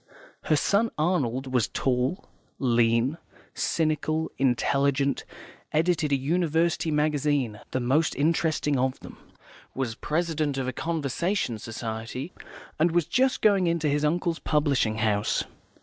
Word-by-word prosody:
Her 155 - +3
son 205 +9 +2
Arnold 135 -6 0
was 125 -3 +2
tall, 130 +7 -1 0.3
lean, 120 +3 +2 0.3
cynical, 155 0 0
intelligent, 140 +2 +1 0.5
edited 160 -1 +1
a - - +5
university 165 +3 +1
magazine 145 -6 0
(the 130 - -1
most 135 +6 +1
interesting 155 -2 +1
of 130 0 0
them), - - -11 0.6
was 130 -4 -2
president 155 +1 -1
of 130 -1 -2
a 130 - -2
Conversation 165 - -1
Society, 115 - -5 0.5
and 165 +3 +4
was 170 -1 +1
just 260 - +1
going 200 -4 +4
into 170 -2 +1
his 145 +1 +1
uncle's 170 +2 0
publishing 140 -7 +1
house. 105 -1 +1
150 Hz, 120 wpm, -26 LUFS, 130-165 Hz, 0.6 s, a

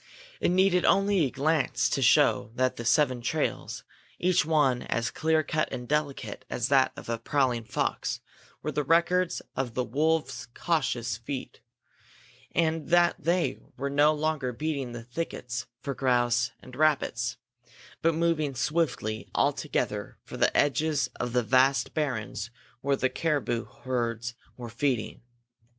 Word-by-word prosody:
It - - +2
needed 180 0 +3
only 195 -4 +3
a - - -1
glance 145 +2 +1
to - - 0
show - - +4
that 130 0 +1
the 120 - -6
seven 130 -1 +3
trails, - - -2 0.3
each 180 -2 +3
one 150 -6 +2
as 120 0 -1
clear 160 0 +1
cut 155 +1 -1
and 125 0 -5
delicate 140 -7 -2
as 120 0 -1
that 135 -2 +4
of - - -9
a 115 0 -2
prowling 125 -2 0
fox, - - -2 0.4
were - - -1
the 150 - -1
records 170 +4 +2
of 125 -2 -3
wolves' 150 +3 0
cautious 120 -9 0
feet; 130 +3 -6 0.9
and 160 -2 0
that 175 0 +4
they 175 +2 0 0.2
were 140 0 -2
no 145 +2 +5
longer 155 -4 -1
beating 135 -1 -3
the 120 -1 -7
thickets 120 -2 -4 0.2
for 140 - -2
grouse 120 -2 +2
and 130 - -11
rabbits, 155 +1 +1 0.6
but 165 -1 +2
moving 160 -4 +1
swiftly 125 -7 -1
all - - +3
together - - -3
for - - -9
the - - +2
edges 145 +1 +2
of 120 0 -2
the 125 -1 +2
vast 130 +3 +3
barrens 125 -7 -2 0.3
where 140 +2 +1
the 130 - +1
caribou 130 -4 -1 0.2
herds 120 -2 -2 0.2
were 120 -1 -7
feeding. 120 -2 -1
140 Hz, 145 wpm, -28 LUFS, 120-155 Hz, 0.9 s, no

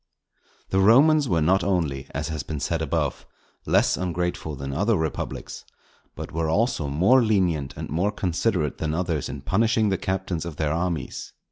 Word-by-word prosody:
The 95 - +2
Romans 135 +8 +5
were 85 -3 +2
not 95 +3 +3
only, 75 -8 -1
as 75 +4 -4
has 80 -2 -3
been 75 +2 -5
said 80 +4 -1
above, 80 - -2 0.4
less - - +3
ungrateful 90 -3 -2
than 70 0 -5
other 105 +8 +2
republics, 80 -1 -4 0.5
but - - -7
were 80 0 -1
also 100 - +1
more 95 - +4
lenient 90 - +1
and - - -5
more 90 +7 0
considerate 90 -5 -1
than 80 -1 -1
others 85 -4 -1
in 70 0 -6
punishing 110 +6 +2
the 95 -1 0
captains 95 -4 -2
of 85 -3 -6
their 75 -1 -1
armies. 85 -4 -3
85 Hz, 165 wpm, -24 LUFS, 75-95 Hz, 0.5 s, Romans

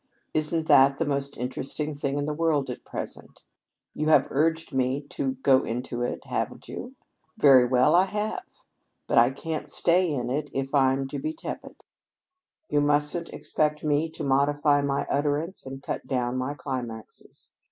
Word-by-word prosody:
Isn't 155 +1 0
that 135 -2 +6
the 165 - 0
most 140 -1 -2
interesting 135 +4 -3
thing 140 -1 -2
in 145 - -1
the 150 - -2
world 150 -4 +1
at 125 - -8
present? - - -8 0.5
You've 155 +1 -1
all 155 - +6
urged 160 +3 0
me 130 +1 +1
to 135 -1 -2
go 130 -2 +5
into 120 +1 -4
it, 120 - -3
haven't - - -3
you? 255 +2 -7 0.4
Very 130 -3 +7
well, 125 0 +3
I 180 +2 +6
have. 210 +2 -3 0.6
But - - +4
I 120 +1 +6
can't 155 +4 -5
stay 175 0 +2
in 125 -4 -2
it 145 +2 -2
if 135 +1 -2
I'm 135 -1 +3
to - - -4
be 310 +2 -3
tepid. 320 - -8 0.8
You 145 - +2
mustn't 150 +3 +1
expect 150 0 -1
me 150 +1 +1
to 160 - -7
modify 145 +1 +3
my 140 0 -1
utterance 145 +3 -1
and 135 +1 -8
cut - - -4
down 125 -2 -1
my 130 +3 -2
climaxes. 125 -5 -7
145 Hz, 165 wpm, -26 LUFS, 130-155 Hz, 0.8 s, Very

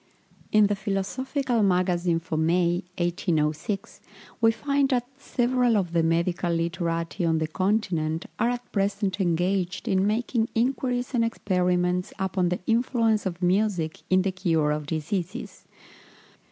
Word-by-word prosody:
In 215 -1 +6
the 205 0 +1
Philosophical 230 +6 -1
Magazine 180 -3 +2
for 165 -1 -5
May, 170 +2 +1
1806, 175 +1 -1 0.4
we 225 - +6
find 280 +3 0
that 245 -3 +1
"several 245 -3 +1
of 175 -4 -1
the 170 - +3
medical 170 +2 +1
literati 170 +1 -2
on 165 -1 +2
the 160 - 0
continent 185 -2 0
are 235 - +3
at 245 0 -4
present 200 0 0
engaged 180 +1 0
in 190 +1 +2
making 225 +1 0
inquiries 250 +1 0
and 235 -2 +2
experiments 180 -4 0
upon 190 -2 0
the 180 - -2
influence 225 -3 +2
of 180 0 -5
music 180 -3 +1
in 185 0 +4
the 195 - 0
cure 165 -5 +1
of 150 -1 -3
diseases." 165 +4 -4
185 Hz, 135 wpm, -26 LUFS, 170-225 Hz, 0.4 s, In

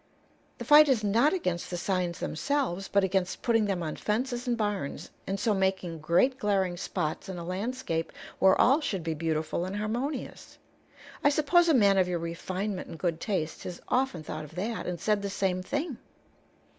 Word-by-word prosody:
The - - -7
fight 300 0 +8
is 240 -5 +2
not 230 +9 +3
against 180 - -2
the 175 - -3
signs 180 -1 -1
themselves, 245 - -1
but 200 -1 +2
against 190 -1 -1
putting 225 -3 +3
them 190 -4 -1
on 155 -2 -3
fences 245 +3 -2
and 240 -1 +1
barns, 205 -9 -3 0.2
and 195 +1 -2
so 215 +2 +2
making 190 -4 -1
great 180 - +2
glaring 195 -4 +1
spots 175 -1 -3
in 185 - -5
a 170 - -5
landscape 185 -2 -3 0.3
where 190 0 +5
all 275 +5 +5
should 195 - -2
be 165 0 -1
beautiful 160 +1 -1
and 185 +2 -4
harmonious. 240 +6 -4 0.7
I 290 - +6
suppose 330 +4 +3
a 315 - +5
man 200 -5 +5
of 185 - +3
your 180 -1 -1
refinement 185 +4 -4
and - - -8
good 165 -1 -2
taste 175 -7 -2
has 175 - -6
often 250 -11 0
thought 155 - -5
of 150 +1 -12
that, 215 +5 -3
and 180 -1 -3
said 210 +3 +1
the 200 - -3
same 190 -2 0
thing." 285 - -3
195 Hz, 185 wpm, -28 LUFS, 175-235 Hz, 0.7 s, fight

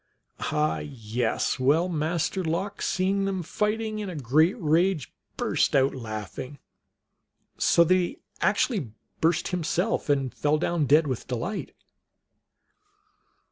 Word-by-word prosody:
Ah, 150 0 +1
yes. 120 -2 -2
Well, 150 +7 +3
Master 170 +3 -1
Lox, 185 +5 -2
seeing 195 +1 +1
them 190 -2 -2
fighting 215 +4 -1
in 205 -2 -4
a 180 - -6
great 155 - +2
rage, 165 -1 +1 0.2
burst - - +1
out 135 0 +4
laughing, 115 +3 -6 1.0
so 170 - +5
that 170 - +3
he 185 - 0 0.2
actually 170 - +1 0.3
burst 165 +2 +1
himself, 180 +2 -1
and 135 -3 +1
fell 150 +1 +1
down 165 -2 0
dead 155 +4 +5
with 130 -5 -3
delight. 130 - -4
160 Hz, 120 wpm, -26 LUFS, 135-185 Hz, 1.0 s, so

